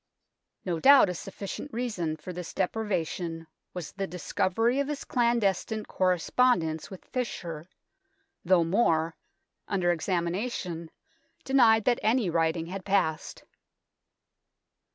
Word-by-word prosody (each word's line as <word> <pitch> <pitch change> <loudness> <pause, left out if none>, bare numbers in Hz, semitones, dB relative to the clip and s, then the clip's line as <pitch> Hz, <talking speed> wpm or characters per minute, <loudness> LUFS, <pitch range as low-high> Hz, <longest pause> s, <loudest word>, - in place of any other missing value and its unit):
No 175 -3 -1
doubt 275 - +7
a - - -4
sufficient 200 - -7
reason 210 -11 -2
for 180 +4 -8
this 175 -1 -7
deprivation 175 -5 -2 0.3
was 175 -5 -5
the 195 -1 -4
discovery 190 +8 0
of 280 - 0
his 295 -1 -4
clandestine 225 -3 0
correspondence 180 -2 +1
with 190 - -11
Fisher, 175 -10 -5 0.7
though 175 -1 +4
More, 165 -3 +1 0.5
under 180 -3 +1
examination, 175 0 -2 0.5
denied 230 -5 +4
that 245 - +3
any 220 -4 +2
writing 165 0 +1
had 185 +2 -6
passed. 190 -6 -1
185 Hz, 110 wpm, -28 LUFS, 170-225 Hz, 0.7 s, doubt